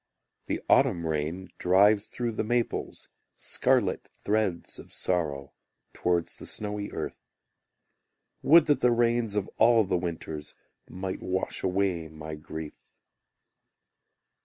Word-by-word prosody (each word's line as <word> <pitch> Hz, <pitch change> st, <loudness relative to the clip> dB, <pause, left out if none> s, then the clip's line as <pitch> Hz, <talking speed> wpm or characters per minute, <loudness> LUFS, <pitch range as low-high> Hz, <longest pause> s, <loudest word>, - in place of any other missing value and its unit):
The -, -, -2 dB
autumn 85 Hz, -1 st, +4 dB
rain 80 Hz, +4 st, -2 dB
drives 100 Hz, +3 st, +4 dB
through 120 Hz, -1 st, -3 dB
the 110 Hz, -, -2 dB
maples 120 Hz, +1 st, -2 dB, 0.3 s
Scarlet -, -, +1 dB
threads 105 Hz, -5 st, -1 dB
of -, -, -12 dB
sorrow, 75 Hz, -6 st, -2 dB, 0.4 s
Towards 85 Hz, -1 st, 0 dB
the -, -, -8 dB
snowy 105 Hz, -1 st, -4 dB
earth. -, -, -5 dB, 1.2 s
Would 165 Hz, +1 st, +7 dB
that 145 Hz, -, +3 dB
the 125 Hz, -, +4 dB
rains 120 Hz, -2 st, +2 dB
of 105 Hz, -2 st, 0 dB
all 115 Hz, 0 st, +6 dB
the 95 Hz, -2 st, 0 dB
winters 80 Hz, -3 st, -5 dB, 0.3 s
Might 95 Hz, 0 st, -5 dB
wash 95 Hz, 0 st, -2 dB
away 95 Hz, -3 st, 0 dB
my 80 Hz, 0 st, -8 dB
grief! 75 Hz, 0 st, -8 dB
95 Hz, 115 wpm, -28 LUFS, 85-110 Hz, 1.2 s, Would